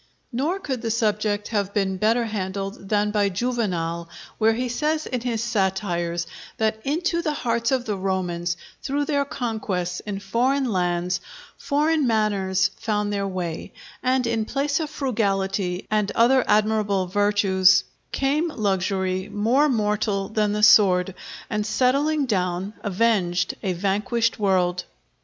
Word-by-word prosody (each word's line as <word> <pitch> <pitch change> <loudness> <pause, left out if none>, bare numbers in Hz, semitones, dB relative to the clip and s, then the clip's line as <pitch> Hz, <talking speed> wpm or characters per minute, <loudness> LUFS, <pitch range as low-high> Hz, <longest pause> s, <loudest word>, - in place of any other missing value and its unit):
Nor 295 +10 -1
could 265 -10 -4
the 230 - -2
subject 210 -2 0
have 200 -3 -1
been 190 -2 0
better 225 +4 +2
handled 195 -1 -4
than 210 0 +2
by 205 -1 +2
Juvenal, 180 -7 -2 0.3
where 220 0 +4
he 250 +2 -1
says 305 +5 -1
in 250 -2 -3
his 230 -2 -2
Satires, 190 -6 -1 0.3
that 220 0 0
into 340 +4 0
the 305 -2 -1
hearts 235 -2 0
of 255 -2 +1
the 210 - -1
Romans, 180 -2 -2 0.2
through 285 +1 -1
their 285 -1 +1
conquests 215 - -3
in 205 -2 -5
foreign 250 +8 +1
lands, 180 -4 0 0.3
foreign 300 0 +1
manners 200 -4 +1
found 210 -2 -1
their 200 -1 -1
way; 180 -4 -4 0.3
and 255 0 +1
in 230 -1 0
place 280 +4 0
of 310 -2 -3
frugality 195 -8 -1
and 210 -1 +1
other 250 +2 +5
admirable 210 -2 +2
virtues— 190 -1 +3 0.3
"Came 290 +5 +1
luxury 190 - -1
more 230 +8 +2
mortal 210 -4 0
than 215 -1 +1
the 210 0 -1
sword, 190 -4 +6 0.3
And 210 0 -1
settling 275 +7 +1
down, 185 -2 -1
avenged 185 -4 +1
a 190 - -1
vanquished 210 +6 0
world." 180 -3 +1
210 Hz, 140 wpm, -23 LUFS, 190-240 Hz, 0.3 s, sword